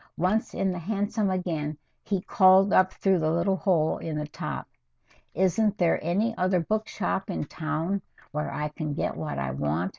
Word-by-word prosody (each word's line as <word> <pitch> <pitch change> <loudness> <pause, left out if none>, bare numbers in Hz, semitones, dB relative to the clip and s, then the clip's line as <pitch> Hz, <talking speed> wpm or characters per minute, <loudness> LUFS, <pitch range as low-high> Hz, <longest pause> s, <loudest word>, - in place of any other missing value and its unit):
Once 190 +6 0
in 190 -1 +1
the 180 - -4
hansom 205 +3 -1
again, 160 -5 -2 0.2
he 195 -3 -1
called 190 +1 +5
up 185 0 +5
through 190 -2 +2
the 155 -1 +1
little 170 +4 +1
hole 170 -6 +1
in 160 -2 -4
the 150 - -2
top. 150 - -5 0.7
"Isn't 200 +4 +2
there 170 -4 +2
any 205 +8 +1
other 185 0 +3
book 215 +6 -1
shop 195 +1 -2
in 180 - -2
town 160 +6 -2 0.3
where 150 -1 -2
I 150 +2 -2
can 150 -1 -4
get - - -1
what 155 -1 -4
I 65 -1 -2
want?" 75 +6 -1
180 Hz, 180 wpm, -27 LUFS, 155-195 Hz, 0.7 s, called